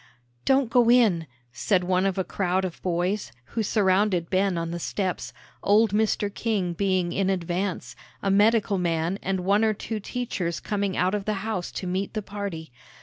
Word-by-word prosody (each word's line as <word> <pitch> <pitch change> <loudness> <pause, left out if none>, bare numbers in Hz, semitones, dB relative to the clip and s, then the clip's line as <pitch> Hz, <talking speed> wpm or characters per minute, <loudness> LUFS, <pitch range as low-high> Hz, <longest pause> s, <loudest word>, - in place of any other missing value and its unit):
"Don't 265 -3 +3
go 240 -1 +4
in," 215 -10 +4 0.3
said 180 +8 +1
one 185 +1 +2
of 195 - -2
a 190 - +1
crowd 185 0 0
of 180 - -6
boys, 180 - -1 0.2
who 230 - 0
surrounded 190 -4 +2
Ben 190 -1 +2
on 165 0 -2
the 175 - -4
steps, 185 +1 -3 0.3
old 215 +1 +4
Mr. 210 -1 +1
King 200 -6 -1
being 185 -1 0
in 195 -1 +1
advance, 180 0 -2 0.3
a 195 - +2
medical 205 -1 +3
man 170 +2 0
and 190 -1 -1
one 200 +4 +3
or 215 -1 +2
two 220 +1 -4
teachers 200 -6 -3
coming 200 -2 -2
out 185 +2 +2
of 205 -2 -2
the 215 - 0
house 215 -6 -3
to - - -4
meet 190 +4 -2
the 215 - -2
party. 195 -7 -6
195 Hz, 180 wpm, -25 LUFS, 180-210 Hz, 0.3 s, go